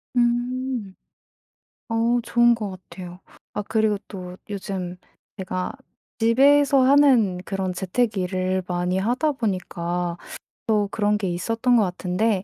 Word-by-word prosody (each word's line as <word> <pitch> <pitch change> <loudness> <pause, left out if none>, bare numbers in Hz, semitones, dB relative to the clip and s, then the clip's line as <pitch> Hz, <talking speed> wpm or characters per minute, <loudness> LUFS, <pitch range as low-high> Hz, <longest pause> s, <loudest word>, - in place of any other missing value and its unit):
음. 240 -3 0 0.9
어 230 +2 +2
좋은 240 0 +4
것 210 -4 -4 0.2
같아요. 180 -1 -9 0.3
아 - - -2
그리고 215 0 +1
또 180 -2 -8
요즘 190 -3 -4 0.4
제가 185 -1 -3 0.5
집에서 275 +4 +5
하는 260 -8 +5
그런 190 -2 -2
재택 205 +4 -1
일을 185 0 -1
많이 180 +1 -1
하다 250 +10 +1
보니까 180 -6 -2 0.5
또 210 -2 +2
그런 210 -1 +1
게 195 -3 -2
있었던 230 +8 +1
것 225 - +5
같은데 185 +2 0
210 Hz, 220 characters per minute, -23 LUFS, 185-240 Hz, 0.9 s, 집에서